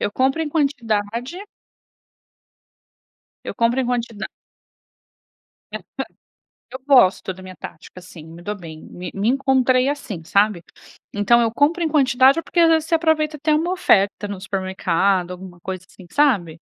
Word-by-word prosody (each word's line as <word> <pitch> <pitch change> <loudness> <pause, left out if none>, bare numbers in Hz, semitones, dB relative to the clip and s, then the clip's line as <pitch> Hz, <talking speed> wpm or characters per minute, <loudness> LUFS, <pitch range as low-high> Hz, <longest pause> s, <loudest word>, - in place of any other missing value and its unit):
eu - - -1
compro 265 +5 +1
em 310 - -3
quantidade 245 -9 0 2.4
Eu - - -5
compro 235 +3 +1
em 250 - -1
quantida 235 -3 -3 1.5
Essa - - -5 0.9
eu 260 - -6
gosto 220 -8 +4
da 185 - -13
minha 185 -1 -11
tática, 160 - -11
assim, 175 -3 -12
me 165 +2 -12
dou 205 +3 -4
bem, 160 -4 -10
me 180 +1 -8
me 200 +3 -1
encontrei 260 -1 +2
assim, 255 - -4
sabe. 200 +1 +1 0.5
Então, 235 +4 +3
eu 230 - +1
compro 305 +7 +1
em 325 - +1
quantidade 270 -1 +4
ou 330 - -3
porque 345 - 0
às 330 - +6
vezes 320 -1 +2
você - - +2
aproveita 315 -2 +1
até 305 +2 0
uma 330 +4 0
oferta 205 - +2
no 200 -2 -6
supermercado, 190 -2 0
alguma 180 -1 -10
coisa 185 +1 -6
assim, 185 - -16
sabe? 195 - +1
230 Hz, 155 wpm, -21 LUFS, 185-285 Hz, 2.4 s, às